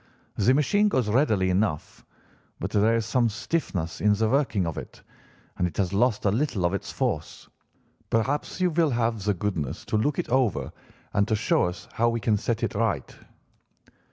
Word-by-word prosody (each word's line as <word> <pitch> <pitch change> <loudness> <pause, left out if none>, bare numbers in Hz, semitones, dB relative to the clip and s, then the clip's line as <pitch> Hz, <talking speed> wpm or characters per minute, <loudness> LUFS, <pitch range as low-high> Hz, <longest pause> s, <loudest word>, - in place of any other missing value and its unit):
The 120 +6 +3
machine 205 +9 +3
goes 130 - +1
readily 105 -6 +2
enough, 90 -5 -1 0.6
but - - -4
there 110 +2 +3
is 115 -1 0
some 120 +1 +2
stiffness 100 - -3
in 105 0 +4
the 110 +2 +1
working 130 -7 +1
of 80 -3 -3
it, - - -12 0.6
and 90 - +2
it 85 - -9
has 95 -2 0
lost 110 +2 +1
a 100 - +4
little 110 -5 0
of 85 - +1
its 100 - -4
force. - - -3 0.6
Perhaps 135 +10 -1
you 180 -1 +2
will 165 -1 +2
have 115 -4 0
the 105 -2 +2
goodness 85 -6 -3
to 110 - 0
look 140 +7 0
it - - -2
over 125 -4 +1 0.4
and 100 +1 +2
to 110 - +1
show 105 - +2
us 90 0 -5
how 120 +1 +2
we 115 0 -1
can 110 -1 +2
set 115 +2 -2
it - - -1
right. - - -1
110 Hz, 185 wpm, -26 LUFS, 100-130 Hz, 0.6 s, in